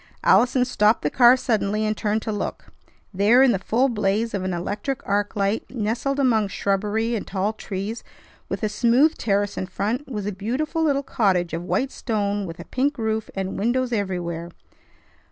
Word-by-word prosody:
Allison 250 0 +4
stopped 215 -3 +2
the 150 - 0
car 245 0 +6
suddenly, 215 -4 0
and 215 0 0
turned 215 0 -1
to 220 - -3
look. 205 - -5 0.4
There 210 +7 +5
in 265 - +5
the 195 - 0
full 235 +7 +1
blaze 215 -1 0
of 195 -2 -2
an 185 - -2
electric 205 +10 -4
arc 205 +1 0
light, 200 +2 -1
nestled 240 +4 -2
among 225 -6 +3
shrubbery 210 +4 -1
and 220 - -3
tall 200 +2 -1
trees, 205 +1 -5 0.5
with - - -4
a - - +3
smooth 240 +8 +3
terrace 200 -1 0
in 185 - -3
front, 230 +9 -2
was 210 -4 -3
a 210 - -1
beautiful 260 - -2
little 280 -3 +1
cottage 185 - +1
of 165 - -2
white 260 +9 -1
stone, 205 -3 -2
with 165 -1 -8
a - - -8
pink 280 +3 -1
roof, 220 -1 -2
and 190 -1 -3
windows 245 +3 0
everywhere. 175 -5 -3
215 Hz, 180 wpm, -23 LUFS, 200-245 Hz, 0.5 s, car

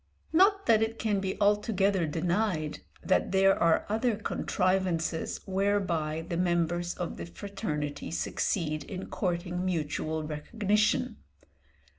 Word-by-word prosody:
Not 395 +4 +4
that 225 -2 +5
it 220 +1 0
can 210 -3 0
be 190 0 -3
altogether 205 -3 +2
denied 170 -1 -1 0.2
that 185 - +2
there 195 0 +5
are 165 -1 +3
other 225 +2 +1
contrivances 185 -5 -1
whereby 185 -5 0
the 170 - -2
members 175 0 0
of 175 - -4
the - - -6
fraternity 150 - -4
succeed 155 - -1
in 185 +5 -7
courting 180 -1 -2
mutual 160 -2 -1
recognition. 210 +9 0
185 Hz, 115 wpm, -29 LUFS, 165-205 Hz, 0.2 s, that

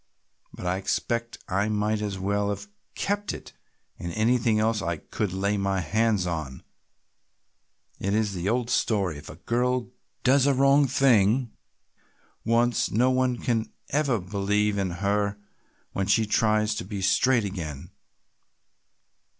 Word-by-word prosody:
But - - -9
I 90 +1 0
expect 115 +4 -2
I 100 +3 0
might 105 0 0
as 100 -2 -3
well 100 +2 0
have 105 - -4 0.3
kept 205 +1 -1
it - - -12 0.5
and 85 - -5
anything 115 0 +2
else 110 0 +1
I 85 -2 -2
could 100 +5 -3
lay 100 +2 0
my 100 -1 0
hands 105 +3 +1
on. 80 -7 -4 1.4
It 100 +2 0
is 110 -2 0
the 90 +1 -2
old 120 +1 0
story, 95 -9 +1
if - - -12
a - - -9
girl 125 +1 -1 0.3
does 135 +1 +4
a 140 - +3
wrong 140 +1 +4
thing 120 -2 +3 0.9
once 115 +1 +2
no 125 +4 +3
one 125 -3 0 0.2
ever 140 -4 +1
believes 100 +2 0
in 95 -1 0 0.2
her 100 0 +1 0.5
when 95 -1 -2
she 110 +2 +3
tries 110 0 +2
to - - -3
be 95 +1 -5
straight 120 +4 +3
again. 80 -8 -6
105 Hz, 140 wpm, -26 LUFS, 100-120 Hz, 1.4 s, does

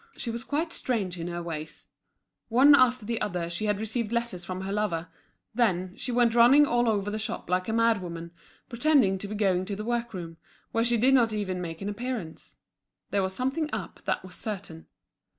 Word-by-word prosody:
She 235 - -3
was 235 +1 -4
quite 320 +5 -2
strange 195 -8 -1
in 165 - -4
her 175 0 -4
ways. 155 -2 -6 0.6
One 265 +5 +7
after 255 -4 +4
the 230 +1 -2
other 175 -4 -2
she 175 +5 -2
had 210 -1 0
received 220 0 -3
letters 235 -6 -2
from 185 +1 -5
her 190 +1 -4
lover; 185 -5 -1 0.4
then, 185 -5 +1
she 250 - -4
went 240 -1 +3
running 245 +5 +7
all 240 -3 +2
over 205 -1 0
the 215 - -3
shop 215 -4 -4
like 185 0 +1
a - - +1
madwoman, 185 -8 0 0.4
pretending 245 -6 +3
to 200 - -5
be 215 - -5
going 190 -3 +2
to 200 +1 -4
the 210 +2 -5
work 235 0 -1
room, 165 -2 -7 0.3
where 225 - +1
she 240 0 +2
did 255 +4 +4
not 235 -4 +4
even 190 -4 -2
make 165 0 -6
an - - -3
appearance. 215 -6 -5 0.6
There 200 - +2
was 190 0 -2
something 275 +5 -1
up, - - -5
that - - -1
was 185 - -10
certain. 185 -6 -6
210 Hz, 205 wpm, -27 LUFS, 185-240 Hz, 0.6 s, One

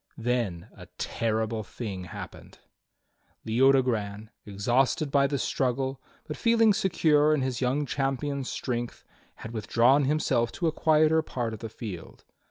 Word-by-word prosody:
Then 115 -7 -2
a - - -12
terrible 110 0 -1
thing 100 -3 -6
happened. 85 - -10 0.9
Leodogran, 115 -4 +1 0.2
exhausted 125 +8 +1
by 140 -1 +4
the 140 0 -1
struggle, 130 +1 -1 0.2
but 150 - -7
feeling 230 -2 +4
secure 155 -5 +3
in 140 - -1
his 130 -1 -2
young 135 +4 +1
champion's 135 0 -2
strength, 120 -2 -4 0.4
had 115 - -6
withdrawn 120 +5 +3
himself 130 -5 +1
to 175 - -3
a 160 - +3
quieter 155 0 +3
part 120 -7 -4
of 110 - -7
the 115 - -6
field. 100 -6 -9
130 Hz, 135 wpm, -27 LUFS, 110-145 Hz, 0.9 s, by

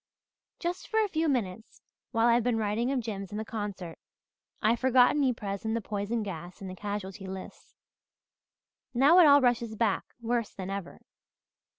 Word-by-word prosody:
"Just 350 +2 -4
for 440 - +1
a - - 0
few 325 -4 0
minutes, 225 -5 -3 0.3
while 225 -1 +2
I've 240 0 +5
been 245 -1 +1
writing 220 +4 0
of 265 -2 0
Jims 200 -4 -5
and 210 - -5
the 220 - -4
concert, 200 -6 -5 0.6
I've 225 +2 +2
forgotten 260 +2 +4
Ypres 210 -7 -2
and 220 0 -1
the - - +1
poison 215 +1 -2
gas 175 -2 -7
and 195 - -7
the 185 - -7
casualty 200 -1 -5
lists. 190 0 -9 1.2
Now 285 +8 +6
it 340 - +8
all 285 0 +7
rushes 235 -3 +1
back, 215 -3 +1
worse 235 -1 -2
than 190 0 -5
ever. 195 -3 -6
220 Hz, 170 wpm, -29 LUFS, 200-245 Hz, 1.2 s, it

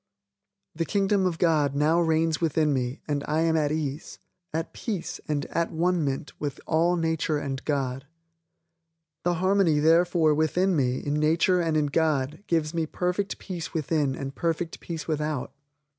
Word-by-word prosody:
The 165 - -1
Kingdom 195 +1 +1
of 170 -3 -2
God 150 -5 +2
now 155 +4 +3
reigns 160 0 +1
within 155 -2 +2
me 125 +1 -2
and 145 -2 -1
I 155 +2 +1
am 165 0 +2
at 150 -2 +1
ease, 150 -1 -3 0.3
at 160 +1 -3
peace 205 -8 -4
and 150 -2 -1
at 170 0 0
one 175 +1 +1
ment 135 0 -3
with 145 -2 -4
all 170 +2 +2
nature 160 -2 0
and 135 -2 -4
God. 135 -2 -2 1.2
The 175 0 +1
harmony 185 -2 +3
therefore 165 +1 +4
within 170 +5 +2
me 130 -3 +1
in 145 - -3
nature 165 +4 +3
and 165 -2 +1
in 150 - +2
God 150 +1 0
gives 160 -2 0
me 165 -2 -1
perfect 180 +4 -2
peace 175 -5 -6
within 150 -3 0
and 135 0 -5
perfect 165 +2 -2
peace 165 -3 -6
without. 150 -3 -2
160 Hz, 160 wpm, -26 LUFS, 145-170 Hz, 1.2 s, therefore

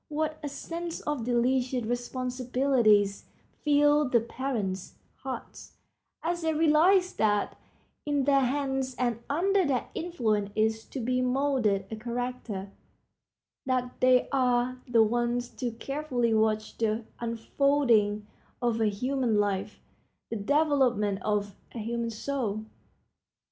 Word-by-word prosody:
What 310 +1 -2
a 290 - -4
sense 335 +4 -5
of 295 -6 -3
delicious 250 +1 +1
responsibility 250 -2 +2 0.6
fills 295 -1 +4
the 235 - +5
parents' 225 -6 -4 0.2
hearts 265 -1 -8 0.5
as 345 +1 -1
they 320 -1 0
realize 335 +5 +4
that 205 -2 +1 0.5
in 290 -2 0
their 275 0 +4
hands 265 -1 -1
and 240 -2 -1
under 380 +6 +2
their 270 -6 -1
influence 220 - -1
is 220 0 +1
to 270 - -7
be 250 +1 0
molded 250 -6 +1
a - - -3
character, 235 -4 -4 1.0
that 250 -1 0
they 255 -1 +4
are 250 -1 +1
the 235 -2 +5
ones 240 +2 0
to 250 - -1
carefully 250 -1 -1
watch 215 0 0
the 220 0 0
unfolding 230 -3 +1 0.3
of 235 -2 0
a 220 - +3
human 240 +1 0
life, 205 0 -2 0.5
the - - -1
development 250 -5 +2
of 205 -2 -1 0.2
a - - -7
human 230 +1 -2
soul. 220 -2 -3
245 Hz, 120 wpm, -28 LUFS, 220-280 Hz, 1.0 s, the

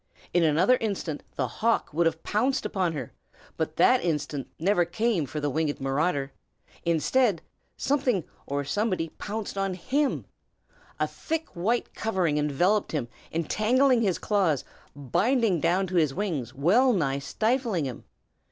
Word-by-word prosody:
In 175 - +4
another 170 +11 +4
instant 195 - -3
the 130 - 0
hawk 230 - 0
would 165 +2 +3
have 165 0 -2
pounced 255 +6 0
upon 185 -5 0
her, 135 -6 -6 0.4
but - - -2
that - - +4
instant 150 -4 -2
never 180 +2 +3
came 195 -3 0
for 150 +5 -4
the 145 - -1
winged 155 0 -1
marauder. 140 +1 0 0.5
Instead, 170 - +2 0.3
something 260 - +1 0.2
or 140 0 -2
somebody 185 -1 -1
pounced 205 -1 -4
on 195 -1 -1
him. 275 +10 0 0.7
A - - +3
thick 320 0 -4
white 215 +8 -1
covering 180 -9 0
enveloped 175 +9 +1
him, 130 -6 -2 0.2
entangling 235 - +2
his 190 -7 +1
claws, 185 - +1 0.3
binding 185 - +1
down 180 +4 +2
his 160 -6 +2
wings, 165 - -2
well 215 - +4
nigh 140 -8 0
stifling 220 - 0
him. 130 -3 -6
180 Hz, 140 wpm, -27 LUFS, 150-220 Hz, 0.7 s, In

